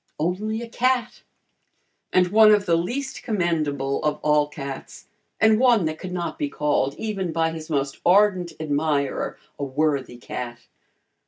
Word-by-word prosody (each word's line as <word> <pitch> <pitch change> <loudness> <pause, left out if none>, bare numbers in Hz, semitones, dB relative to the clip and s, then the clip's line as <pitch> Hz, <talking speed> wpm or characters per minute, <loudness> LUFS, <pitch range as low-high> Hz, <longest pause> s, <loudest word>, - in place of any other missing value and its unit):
Only 210 +8 -2
a - - -7
cat! 245 0 0 0.9
And 180 -1 +3
one 215 +2 +7
of 205 -1 +4
the 170 - +3
least 245 +12 -3
commendable 155 - -1
of 150 -1 0
all 150 -1 +3
cats, 140 -2 -8 0.3
and 220 0 +5
one 240 -7 +4
that 155 0 -3
could 185 - -6
not 180 - -4
be 295 -2 -1
called, 145 - 0
even 195 -5 -3
by 165 0 +1
his 160 0 -8
most 140 -3 -1
ardent 185 -2 +4
admirer, 145 -2 -1 0.2
a - - -2
worthy 140 -2 -1
cat. 120 0 -6
170 Hz, 150 wpm, -23 LUFS, 145-215 Hz, 0.9 s, one